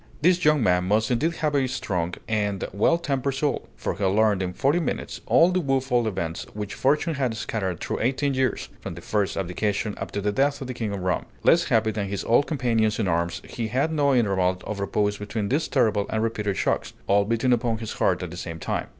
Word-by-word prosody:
This 180 +1 +4
young 150 -4 +4
man 90 -1 +3
must 110 +5 +1
indeed 155 +8 +1
have 150 -2 -1
had 140 - +3
a - - 0
strong 90 -8 -2
and 105 -3 -1
well 110 - +3
tempered 140 -4 -1
soul; 145 +1 -1
for - - -3
he 100 - -5
learned 100 +1 +3
in 90 -1 -2
forty 140 - +1
minutes 170 - -3
all 170 +2 +5
the 185 - +1
woful 135 -5 +1
events 85 -5 -3
which 105 -1 -4
fortune 150 +5 +1
had 130 -6 -1
scattered 95 -7 -3
through - - -3
eighteen 135 +4 +1
years, 130 0 -1
from - - -7
the - - -9
first 105 -2 -1
abdication 100 +3 -1
up - - -4
to - - -3
the 105 +1 0
death 140 +5 +1
of 135 - -5
the 130 - -4
King 115 -3 -3
of 100 -2 -4
Rome. 90 0 -1 0.2
Less - - +5
happy 110 -1 +2
than 105 -2 -3
his 100 -1 -3
old 120 +5 +3
companions 115 -7 +1
in 110 - 0
arms, 85 0 -1
he 115 -2 -4
had 135 +8 0
no 145 -3 +2
interval 95 -5 +2
of 105 -2 -4
repose 105 +1 0
between 105 0 -3
these 150 +4 +1
terrible 110 -6 +2
and 110 0 0
repeated 105 -3 -1
shocks, - - -1
all 100 +1 +4
beating 115 +4 +1
upon 120 -1 0
his 110 -1 -6
heart 90 0 +1
at 90 - -5
the 90 - -8
same 85 -2 -5
time. 80 - -3
110 Hz, 225 wpm, -25 LUFS, 100-135 Hz, 0.2 s, all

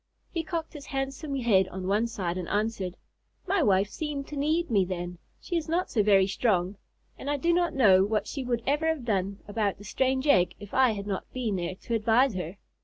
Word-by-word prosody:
He 335 -2 -2
cocked 330 0 -4
his 295 -3 -9
handsome 275 +2 -3
head 215 -8 +3
on 185 0 -6
one 210 +4 +2
side 185 -6 -3
and 180 -2 -4
answered: 205 -3 -1 0.5
"My 385 -1 +1
wife 200 -5 +3
seemed 295 -3 -4
to 295 - -6
need 310 +2 0
me 200 -4 +4
then. 175 -1 -5 0.2
She 350 - -4
is 330 -1 -1
not 350 +3 0
so 220 - +3
very 195 -2 +5
strong. 195 -2 0 0.4
And 280 - -5
I 290 - +1
do 340 +5 +2
not 345 -2 +1
know 195 -8 +6
what 210 +1 0
she 275 - -4
would 240 -2 -1
ever 295 +3 +1
have 320 -6 -1
done 195 -2 -1
about 205 -1 -1
the 205 - -12
strange 260 +5 0
egg, 185 -11 +4
if 205 - -11
I 260 -3 +4
had 200 -1 -5
not 195 -2 -4
been 235 -6 -1
there 180 0 -3
to 230 - -6
advise 230 +3 +3
her." 180 0 -5
225 Hz, 220 wpm, -28 LUFS, 195-280 Hz, 0.5 s, know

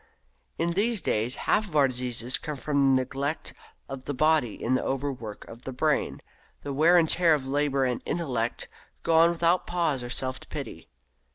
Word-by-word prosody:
In 170 - 0
these 215 +5 +1
days 120 -5 0
half 215 - +2
of 165 - -10
our 140 -2 +5
diseases 125 -1 -2
come 150 -1 -5
from 140 +1 -1 0.2
the 130 - +3
neglect 140 +4 -4 0.3
of 135 -1 -7
the 145 - -3
body 155 -4 +2
in 125 - -1
the 130 - +1
overwork 130 -6 -4
of 115 +1 -11
the 130 - -6
brain. 150 +4 0 0.4
The 140 - -4
wear 165 +5 +5
and 165 -2 +4
tear 165 -1 +4
of 135 -3 -5
labour 140 0 +1
and 125 -2 -1
intellect 125 -9 -2 0.4
go 165 - +2
on 165 +1 +6
without 170 +1 +1
pause 165 -7 0
or 120 - -6
self 130 +1 -2
pity. - - -7
140 Hz, 185 wpm, -27 LUFS, 130-165 Hz, 0.4 s, on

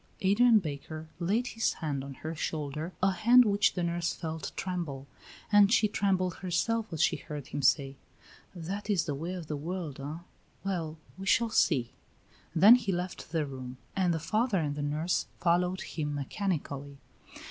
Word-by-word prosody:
Adrian 225 +4 +5
Baker 155 -2 -5
laid 205 +8 +1
his 225 - 0
hand 145 -5 -3
on 140 -1 -8
her 160 +4 -5
shoulder, 155 +1 -3
a 190 - +5
hand 240 +6 +6
which 200 -1 +3
the 180 - -1
nurse 170 0 -1
felt 160 -1 -5
tremble, 170 -8 -3 0.5
and 205 -1 +6
she 225 -2 +5
trembled 190 -4 0
herself 215 +5 -1
as 160 -1 +1
she - - +2
heard 145 -3 -8
him - - -3
say: 135 0 +2 0.6
"That 195 +5 -5
is 190 -6 +2
the 145 - -2
way 165 +6 -4
of 175 -3 -6
the 150 - -3
world, 160 -1 -5
eh? 150 +5 -6 0.4
Well, 165 -5 -3 0.2
we 195 - -6
shall 230 +2 +3
see." 130 - +2 0.6
Then 210 +9 +9
he 220 -5 -2
left 180 0 -4
the 160 -3 0
room, 130 -2 -7 0.2
and 185 -2 +2
the 165 - +1
father 215 +7 +1
and 150 -4 0
the 145 - -4
nurse 150 +4 0
followed 180 +2 +2
him 150 -2 -3
mechanically. 145 -3 -3
170 Hz, 170 wpm, -30 LUFS, 150-195 Hz, 0.6 s, Then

